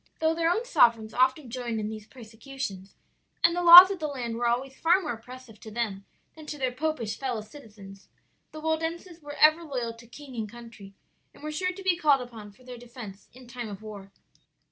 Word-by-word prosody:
"Though 320 0 +1
their 330 0 0
own 440 +7 0
sovereigns 230 - +3
often 260 +1 +1
joined 240 -3 -4
in 210 - -3
these 215 -1 -8
persecutions, 220 -4 -9 0.5
and 335 0 +4
the 355 - -1
laws 350 +2 +11
of 385 - -5
the 310 - -2
land 245 -5 -5
were 240 +1 -1
always 260 +3 -2
far 335 +6 +3
more 310 -9 -4
oppressive 240 -1 -13
to 220 - -11
them 210 -3 -4 0.3
than 310 -1 -13
to 300 - -6
their 260 -2 -1
popish 255 -5 -3
fellow 250 -5 -3
citizens, 210 -5 -14 0.4
the 310 - -9
Waldenses 325 +2 -3
were 290 0 -9
ever 310 +2 +5
loyal 250 -7 -4
to 230 +1 -16
king 270 +2 -12
and 220 -2 -4
country 230 -4 -13 0.4
and - - -17
were 305 - -4
sure 365 +4 -2
to 385 +1 -11
be 370 -2 +2
called 295 -6 +3
upon 225 -4 -10
for 225 +6 -23
their 250 -1 -10
defence 235 -5 -11
in 255 +1 -15
time 240 -2 -7
of 205 +1 -9
war. 200 -2 -10
250 Hz, 210 wpm, -27 LUFS, 220-310 Hz, 0.5 s, laws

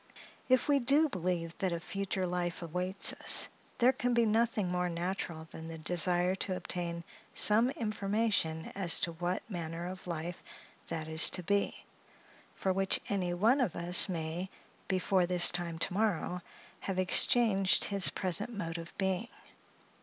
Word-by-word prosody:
If 255 0 +3
we 285 -1 +3
do 285 +5 +3
believe 175 -4 -3
that 190 -2 0
a 170 - -2
future 195 +1 -4
life 175 -1 -3
awaits 180 +3 +1
us, - - +6 0.3
there 250 +1 +5
can 245 -1 -1
be 235 -1 +3
nothing 220 -2 +1
more 180 0 -1
natural 170 -2 -4
than 160 0 -9
the 165 0 -7
desire 175 +2 +1
to 185 - -1
obtain 170 -2 -4 0.3
some 220 +4 +3
information 210 - -1
as 175 -4 +3
to 170 - 0
what 175 +2 -4
manner 170 -4 -5
of 185 0 -8
life 170 0 -5 0.5
that 160 -2 -5
is 160 +1 +4
to 180 - -2
be 200 +3 -1 0.7
for 190 - -1
which 195 0 +1
any 180 -3 -1
one 230 +9 +3
of 220 -10 -1
us 175 +3 +4
may, 170 +1 -4 0.4
before 185 -1 +1
this 180 -1 +3
time 175 -2 -4
to 175 - 0
morrow, 180 -3 -1 0.4
have 195 -2 -4
exchanged 195 +1 +4
his 200 -2 +3
present 200 +4 -1
mode 170 -6 -5
of 165 0 -11
being. 190 +3 -1
180 Hz, 155 wpm, -31 LUFS, 170-200 Hz, 0.7 s, us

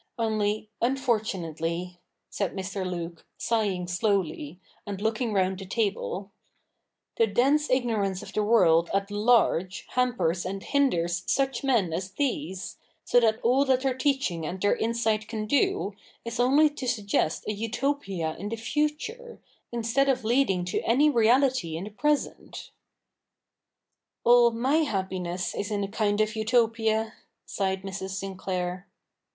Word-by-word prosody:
Only, 215 -2 0
unfortunately,' 180 - -1 0.3
said 200 -2 -3
Mr. 190 0 -4
Luke, 170 -2 -5
sighing 205 -6 0
5"lowly, 175 -4 -1 0.3
and 200 -2 -5
looking 220 +2 -1
round 190 -2 +1
the 195 - -7
table, 200 -1 -2 0.4
' - - -55
the 230 - +4
dense 275 +8 +2
ignorance 220 -7 0
of - - -10
the 215 - +1
world 170 -7 +4
at 200 +1 -1
large 205 -4 +2
hampers 245 -9 0
and 195 +1 -5
hinders 175 -12 +1
such 270 -2 0
men 230 -11 +2
as 190 +3 -4
these, 265 -7 -3 0.3
so 245 - +5
that 225 -1 +2
all 255 +4 +4
that 260 -1 +2
their 265 -1 +1
teaching 260 - 0
and 175 +4 -4
their 205 +2 +2
insight 220 -2 0
can 220 -1 -4
do, 285 - +1 0.3
is 230 0 -5
only 275 +5 +5
to 285 -3 -6
suggest 205 -8 0
a 210 - 0
Utopia 220 - -2
in 205 +3 -4
the 230 - -2
future, 300 - -3 0.3
instead 240 +4 +1
of 255 -2 +1
leading 220 -6 +2
to 180 - -1
any 285 +6 +3
reality 240 - +3
in 170 - -5
the 210 - -7
present.' 295 +7 -2 0.7
' - - -59
All 240 0 +7
my 250 +6 +1
happiness 190 - -2
is 205 - -3
in 205 -1 -1
a - - -2
kind 205 0 0
of 215 +1 0
Utopia,' 225 -1 +1 0.3
sighed 190 -1 -2
Mrs. 190 0 -5
Sinclair. 185 -1 -4
215 Hz, 145 wpm, -27 LUFS, 190-245 Hz, 0.7 s, All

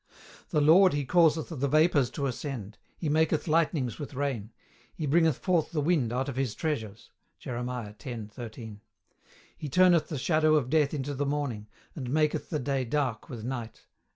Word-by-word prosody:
"The 150 - +1
Lord 175 +5 +6
He 145 -1 -1
causeth 160 0 +3
the 140 -4 -2
vapours 150 -3 +3
to 140 - -1
ascend; 125 -5 -5 0.2
He 165 - -3
maketh 155 +1 +1
lightnings 155 -5 +1
with 145 -2 -7
rain; 130 -6 -2 0.4
He 155 - -3
bringeth 160 0 +3
forth 175 -4 +1
the 160 - -1
wind 145 -6 +1
out 130 +3 -1
of 140 - -4
his 130 -5 -1
treasures." 115 -9 -4 0.3
Jerem. 125 -1 -4 0.3
10. 120 -6 -6
13. 110 -2 -9 0.7
"He 150 - -6
turneth 175 +2 +4
the 150 - -4
shadow 155 +2 +3
of 135 -4 0
death 155 -1 +2
into 145 0 -3
the 140 +1 -2
morning, 140 -8 -2 0.3
and 130 -5 -6
maketh 150 +2 0
the 155 - -1
day 135 -1 -1
dark 125 -2 -2
with 115 -4 -7
night." 120 -2 -6
145 Hz, 175 wpm, -28 LUFS, 125-155 Hz, 0.7 s, Lord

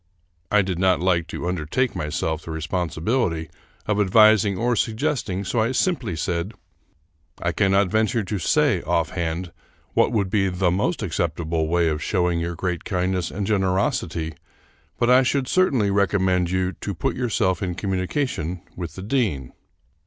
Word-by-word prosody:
I 105 -1 +4
did 90 -2 -3
not 95 -2 +3
like 85 -2 +1
to 85 - -5
undertake 90 - -1
myself 75 +1 -2
the - - -10
responsibility 80 - -1 0.3
of 105 -1 0
advising 105 0 +5
or 120 +3 +1
suggesting, 110 -5 -1
so 95 +6 -1
I 115 +3 +1
simply 130 - 0
said: 85 +5 -2 0.4
" 75 0 -43
I 85 - 0
cannot 95 +1 +2
venture 110 +2 +1
to 100 +1 -3
say, - - +2
offhand, 85 +1 -2 0.4
what - - +3
would 100 -5 0
be 100 -3 +2
the 90 -1 +1
most 105 - 0
acceptable 80 -3 -1
way 85 +1 +2
of 75 -1 -1
showing 90 -3 +1
your 85 +1 -3
great 90 -1 -3
kindness 90 -2 -1
and 100 0 -3
generosity, 95 - 0 0.6
but 120 +1 +2
I 130 +1 +7
should 130 0 0
certainly 130 - +2
recommend 95 -3 +2
you 95 0 0
to 100 - -4
put - - -1
yourself 105 -7 0
in 90 -3 -2
communication 95 - -2
with 85 -4 -6
the 95 - -7
dean." 100 - -1
95 Hz, 155 wpm, -23 LUFS, 85-105 Hz, 0.6 s, I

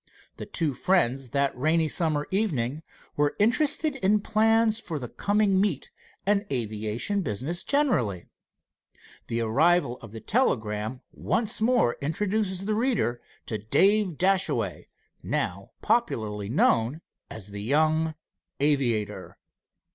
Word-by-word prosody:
The - - -7
two 160 -5 -1
friends 135 -5 +1
that 140 +3 0
rainy 155 +5 +1
summer 155 -2 +2
evening 155 - -1 0.3
were 145 0 +1
interested 285 +6 +2
in 210 -2 +2
plans 220 +1 +2
for 180 -8 -5
the 125 -4 -5
coming 200 - +1
meet 190 -9 -1 0.3
and 200 0 +2
aviation 110 - -1
business 140 - -3
generally. 130 - +1 1.0
The 115 0 -2
arrival 135 +3 +2
of 115 - -12
the 110 - -8
telegram 110 - -1
once 220 -1 -1
more 230 - +2
introduces 190 +5 -1
the 215 - 0
reader 215 - 0 0.2
to 110 - -3
Dave 190 - +2
Dashaway, 190 +1 0 0.3
now - - -3
popularly 105 - -1
known 120 +3 +2 0.3
as 105 -2 -8
the 100 0 -6
young 155 +6 +1 0.4
aviator. 135 -7 0
155 Hz, 115 wpm, -26 LUFS, -, 1.0 s, summer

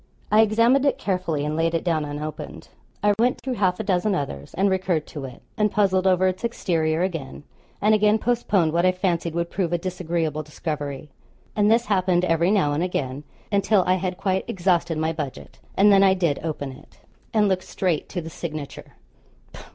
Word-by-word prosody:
I 215 +1 +6
examined 230 +5 +3
it - - +1
carefully, 175 -6 -1
and 150 +1 -2
laid 165 +1 +1
it 165 - -1
down 160 -4 0
unopened. 150 +1 -7 0.3
I 205 0 +4
went 245 +2 +2
through 260 - -3
half 185 -5 +1
a - - -2
dozen 195 0 +1
others, 70 - -5
and 195 +2 +2
recurred 185 -5 0
to 145 -3 -7
it, 130 -2 -11
and 210 -1 +2
puzzled 190 -2 +2
over 185 0 +3
its 185 +2 -1
exterior 165 -8 0
again, 160 -7 -4 0.4
and 210 +1 +3
again 215 0 +4
postponed 210 -9 +1
what 170 +1 +2
I 185 0 +4
fancied 175 -3 -1
would 170 0 -2
prove 180 -3 -1
a 175 - +2
disagreeable 170 -3 -2
discovery; 150 -2 -5 0.4
and 210 0 +3
this 235 +2 +3
happened 185 -3 +2
every 165 0 +2
now 185 -8 +2
and 150 - -1
again, 145 -6 -3 0.3
until 200 -1 +3
I 185 - +3
had 185 0 -3
quite 190 -1 0
exhausted 175 -3 0
my 160 +1 0
budget, 150 -4 -7 0.2
and 205 +2 +6
then 195 -1 +6
I 190 -1 +5
did 170 -6 0
open 150 -4 -4
it, 130 - -16 0.3
and 215 -2 +3
looked 190 -1 +1
straight 175 -5 -1
to 180 - -3
the 165 - -7
signature. 155 -4 -7
180 Hz, 190 wpm, -23 LUFS, 155-195 Hz, 0.4 s, I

